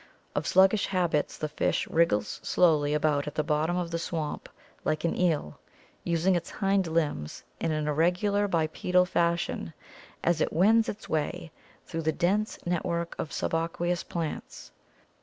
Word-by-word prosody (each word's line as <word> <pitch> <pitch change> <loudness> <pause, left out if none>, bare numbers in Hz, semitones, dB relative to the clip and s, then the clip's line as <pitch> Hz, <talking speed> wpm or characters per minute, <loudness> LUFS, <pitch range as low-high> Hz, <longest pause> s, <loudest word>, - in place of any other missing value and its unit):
Of - - -2
sluggish 190 +2 +4
habits, 175 -6 0
the 155 - -2
fish 150 - -1
wriggles 130 -11 +1
slowly 150 -4 +3
about 150 -1 +1
at 150 - -5
the 155 - +1
bottom 155 +3 0
of 175 -2 -2
the 165 - -1
swamp 160 -3 -4 0.3
like 155 0 -1
an 170 - 0
eel, 160 - 0 0.4
using 170 +2 +2
its 175 0 -2
hind 195 -2 +1
limbs 155 - -2 0.2
in 165 - -1
an 155 -1 -1
irregular 180 +7 +2
bipedal 180 +1 +2
fashion 170 -2 -1 0.5
as 170 -2 +2
it - - +1
wends 220 +6 +4
its 210 - -7
way 165 +2 -2 0.3
through 165 - -4
the 160 0 +1
dense 200 +7 0
network 170 -1 -1
of 155 - -3
suba 165 0 -1
queous 175 +1 -1
plants. 165 -3 -5
170 Hz, 155 wpm, -28 LUFS, 155-180 Hz, 0.5 s, sluggish